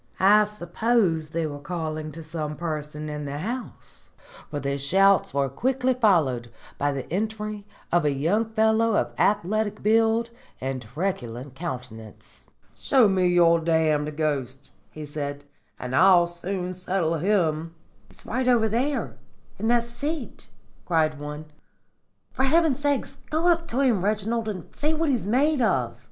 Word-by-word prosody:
I 210 +2 +6
suppose 195 -4 0
they 165 0 -2
were 145 -2 -5
calling 155 -1 -4
to 165 +2 -8
some 155 -1 -4
person 150 -2 -5
in 150 -1 -5
the 140 0 -4
house, 235 - -7 0.4
for 145 - -3
the 140 0 -2
shouts 195 +6 +3
were 140 0 +1
quickly 255 - 0
followed 160 - +2 0.3
by 145 +1 +1
the 135 -2 -5
entry 215 0 -3 0.3
of 175 -1 +3
a 150 - +2
young 165 +11 +1
fellow 220 0 +2
of - - 0
athletic 210 +1 +1
build 225 +2 +3 0.3
and 130 0 -3
truculent 125 - -4
countenance. 125 -8 -8 0.3
"'Show 260 -5 +4
me 185 -2 +2
your 170 -1 +5
damned 155 -2 +1
ghost,' 135 -4 -2 0.2
he 150 +8 -8
said, 145 -1 -5 0.4
'and 125 +1 -4
I'll 180 +1 +6
soon 180 +1 -4
settle 180 -2 -1
him.' 165 -4 0 0.3
"'He's - - -15
over 245 -2 +2
there 255 +6 -1 0.4
in 220 - -1
that 240 0 +3
seat,' 275 +4 -5 0.3
cried 155 -3 +1
one. 150 +1 -6 0.9
'For 265 - +1
heaven's 315 -1 +3
sake, 285 -2 +1 0.2
go 320 +3 +1
up 335 -1 +2
to 255 +4 -1
him, 235 -9 +2
Reginald, 215 +2 -1
and 185 -5 -7
see 305 +2 0
what 320 0 0
he's 240 -8 0
made 275 +5 +2
of.' 225 - 0
180 Hz, 145 wpm, -25 LUFS, 150-225 Hz, 0.9 s, I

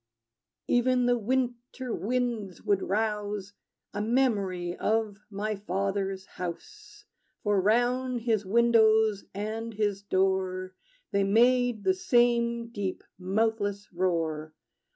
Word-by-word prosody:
Even 250 0 +3
the 245 0 +4
winter 245 +1 -2
winds 230 -5 -2
would 200 -2 +2
rouse 210 -1 -2 0.4
A 205 - -2
memory 200 -7 0
of 215 -2 0
my 210 +1 -2
father's 195 0 -2
house; 175 -4 -8 0.4
For 205 -2 +2
round 245 +4 +1
his 220 -3 +1
windows 220 -1 +4
and 220 +2 -4
his 205 -2 0
door 185 -1 0 0.4
They 200 0 +2
made 240 +2 +3
the 375 - +3
same 235 -8 +2
deep, 200 -5 -4 0.2
mouthless 205 +1 -1
roar. 165 -4 -1
210 Hz, 105 wpm, -28 LUFS, 195-235 Hz, 0.4 s, the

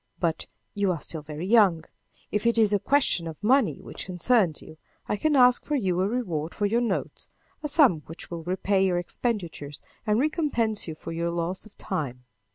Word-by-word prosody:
But, 165 -2 -1 0.3
you 200 -2 +1
are 170 - -2
still 160 +1 -3
very 150 +3 -6
young! 195 -6 +4 0.5
If 210 +2 0
it 235 - +2
is 215 -2 +4
a 205 - +3
question 250 -10 +2
of 160 +4 -9
money 250 -3 +3
which - - -8
concerns 185 -2 +2
you, 155 - -13 0.3
I - - 0
can 300 +7 +1
ask 250 -2 +5
for 300 - -1
you 185 -8 0
a 190 - +2
reward 175 -9 -3
for 205 - 0
your 230 +4 +2
notes, 235 - -3 0.3
a 300 - -2
sum 275 - +4
which 165 +2 -8
will 170 -1 -4
repay 190 +2 +1
your 185 -2 +2
expenditures 175 - -3 0.3
and 210 0 +3
recompense 265 - 0
you 160 - -5
for - - -8
your 170 +1 -1
loss 170 +4 -3
of 210 - -22
time." 135 -9 -4
190 Hz, 195 wpm, -26 LUFS, 170-235 Hz, 0.5 s, ask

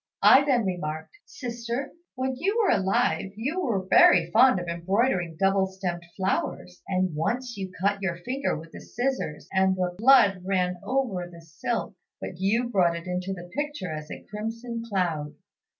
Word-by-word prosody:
I 270 - +8
then 255 -6 +2
remarked, 160 -4 -4
'Sister, 240 +1 -5 0.2
when 260 0 -2
you 390 - -1
were 430 - +3
alive 195 0 0
you 285 - -2
were 205 - -1
very 170 -2 +6
fond 235 -1 +5
of 175 - -6
embroidering 175 0 0
double 195 0 +3
stemmed 185 -2 -4 0.2
flowers; 90 - -2
and 185 -2 0
once 235 +10 -2
you 190 -2 -5
cut 200 +1 +1
your 185 -3 -1
finger 255 +11 -2
with 160 +1 -11
the - - -10
scissors, 245 - -3
and 190 0 +3
the 180 -1 -1
blood 215 -6 +6
ran 180 -1 0
over 235 -10 -1
the 170 -1 -12
silk, 165 +8 -3 0.3
but 175 - -7
you 220 +6 +1
brought 180 -6 +2
it 170 +1 -7
into 180 +1 -3
the 175 -2 -7
picture 290 - -3
as 155 0 -7
a - - -8
crimson 230 +3 -5
cloud. 165 -7 -1
195 Hz, 165 wpm, -26 LUFS, 175-240 Hz, 0.3 s, I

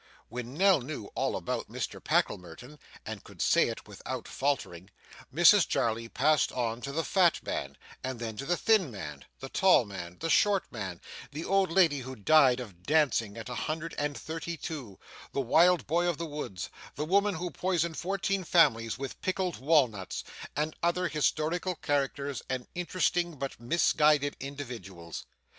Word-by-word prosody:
When 125 +2 -6
Nell 190 -3 +5
knew 125 -5 -6
all - - 0
about - - -3
Mr - - -5
Packlemerton, 90 - -1 0.3
and - - -6
could - - -15
say - - +4
it - - -6
without - - -6
faltering, 105 -10 -2 0.4
Mrs - - +6
Jarley 115 0 0
passed 150 +5 +2
on 120 -1 -2
to 140 - -4
the 165 +3 -1
fat 180 -2 +3
man, - - -4 0.3
and 130 -2 -4
then 115 -2 -4
to 135 - -5
the 175 +1 +2
thin 215 -8 +3
man, 75 - -8 0.2
the 135 - -6
tall 185 -8 +5
man, 90 -3 -8
the - - -2
short 200 +3 +4
man, 95 -7 -5 0.3
the 150 +3 -5
old 195 -2 +2
lady 165 -6 +4
who 130 +1 -7
died 130 +2 +5
of 100 -8 -9
dancing 125 - +2
at 115 - -7
a 125 - -5
hundred 155 +7 -3
and 145 0 -1
thirty 165 +1 -5
two, 140 - -6 0.4
the - - -1
wild 170 +8 +4
boy 170 +4 +1
of 175 -4 0
the 170 - -3
woods, 145 - -5 0.2
the 150 - -2
woman 200 +4 +2
who 175 +1 -4
poisoned 170 -3 0
fourteen 195 +2 -1
families 135 -10 +3
with 135 0 -6
pickled 185 -1 -1
walnuts, 130 - +1 0.3
and 150 +1 -1
other 175 +1 +1
historical 160 +4 0
characters 140 -2 -1
and 130 -1 -2
interesting 175 -1 0
but 135 -1 -5
misguided 150 +2 +3
individuals. 120 - -7
145 Hz, 165 wpm, -30 LUFS, 120-170 Hz, 0.4 s, Mrs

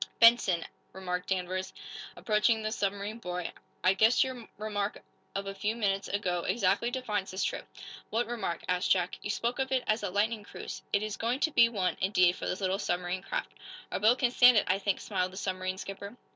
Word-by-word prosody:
"Benson," 230 -7 +6 0.3
remarked 180 -1 -4
Danvers, 185 0 -2 0.4
approaching 220 +1 +2
the 215 - -1
submarine 205 +2 -2
boy, 180 -4 -4 0.3
"I 185 - +5
guess 220 +5 +5
your 255 -3 -6
remark 205 -1 -2 0.4
of 195 0 -2
a 195 - -4
few 210 +3 -1
minutes 200 -3 0
ago 185 -3 -1
exactly 195 +4 +1
defines 215 -6 -2
this 190 - -2
trip." - - -2 0.4
"What 230 +2 0
remark?" 215 -8 -3
asked 180 0 +1
Jack. 180 -1 +1
"You - - -5
spoke 235 +5 -1
of 265 0 -1
it 260 -1 +2
as 215 +1 +1
a 205 - -2
lightning 210 +3 0
cruise. - - -8
It 200 - +2
is 215 -1 -4
going 240 +3 0
to 315 - +2
be 235 -4 +6
one, 195 -5 -1
indeed, 185 -2 +4
for - - -5
these 185 - -2
little 190 +1 0
submarine 180 -1 -1
craft." - - -3 0.4
"Our - - -1
boat 220 +5 +5
can 250 -2 +2
stand 245 -1 +7
it, 210 - +5
I 185 +1 +2
think," 200 -1 0
smiled 185 -2 -2
the - - -9
submarine 185 -1 -2
skipper. 200 +4 -7
200 Hz, 200 wpm, -30 LUFS, 185-225 Hz, 0.4 s, stand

